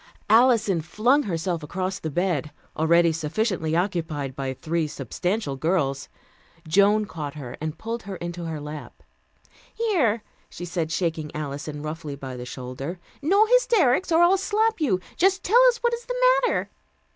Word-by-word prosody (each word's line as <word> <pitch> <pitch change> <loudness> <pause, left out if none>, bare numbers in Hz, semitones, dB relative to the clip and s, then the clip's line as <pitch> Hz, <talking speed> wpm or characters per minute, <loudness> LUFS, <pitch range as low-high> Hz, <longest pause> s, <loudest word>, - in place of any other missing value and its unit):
Alison 225 -6 +4
flung 225 - +2
herself 170 - -2
across 185 +5 -3
the 160 - -4
bed, 165 -2 -1 0.3
already 170 +1 +4
sufficiently 160 +1 -1
occupied 160 -7 -2
by 135 -1 -3
three 160 +4 -2
substantial 180 +1 -3
girls. 140 -2 -1 0.6
Joan 200 +5 +4
caught 155 -6 -6
her 130 -5 -7
and 155 0 -4
pulled 230 +4 -4
her 195 -1 -7
into 175 -1 -6
her 160 -2 -4
lap. 150 0 -9 0.7
"Here," 300 - +1 0.3
she 175 - -7
said, 170 -2 -3
shaking 160 -3 -1
Alison 145 0 -5
roughly 155 -2 -5
by 135 -2 -7
the 125 0 -7
shoulder. 130 +7 -6 0.2
"No 395 +9 +4
hysterics, 385 - +3
or 330 +1 +5
I'll 365 +3 +5
slap 430 +1 0
you. 210 -12 +2 0.2
Just 385 +1 +2
tell 470 +6 +5
us 475 - 0
what 475 0 +2
is 470 0 -4
the - - -2 0.3
matter." - - -1
175 Hz, 155 wpm, -24 LUFS, 155-235 Hz, 0.7 s, or